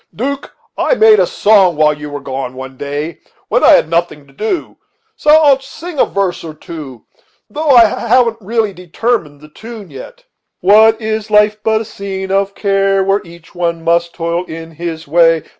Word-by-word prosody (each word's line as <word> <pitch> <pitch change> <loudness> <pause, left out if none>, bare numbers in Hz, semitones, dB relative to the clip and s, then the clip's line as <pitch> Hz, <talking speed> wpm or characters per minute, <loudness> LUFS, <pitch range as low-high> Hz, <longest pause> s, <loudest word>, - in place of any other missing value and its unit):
'Duke, 275 +4 -4 0.3
I - - +2
made 440 -2 +5
a - - +3
song 195 -5 +3
while 150 0 +3
you 150 0 -8
were 145 0 -6
gone 130 -1 -5
one 130 0 -9
day 145 +4 -5 0.3
when - - +1
I - - +7
had - - +4
nothing 165 -3 -2
to 135 - -22
do; 220 - -4 0.4
so 300 - -2
I'll 300 -3 +6
sing 305 +5 -10
you - - +5
a - - -13
verse 195 -3 -2
or 160 -2 -8
two, 150 -7 -10 0.5
though 310 +6 -3
I 240 -4 +7
haven't 235 +1 +1
really 215 0 -1
determined 180 -2 -2
on 145 - -24
the 150 - -14
tune 215 0 -11
yet. 145 - -11 0.4
"What 220 +4 +5
is 220 -1 -3
life 210 0 +3
but 220 0 +1
a - - -6
scene 190 -2 -6
of 195 0 0
care, 195 -1 +1
Where 195 +1 +1
each 170 -2 -16
one 170 -2 -2
must 170 +1 0
toil 170 +1 -2
in 165 -1 -9
his 165 0 -6
way? 165 0 +3
190 Hz, 190 wpm, -14 LUFS, 160-220 Hz, 0.5 s, I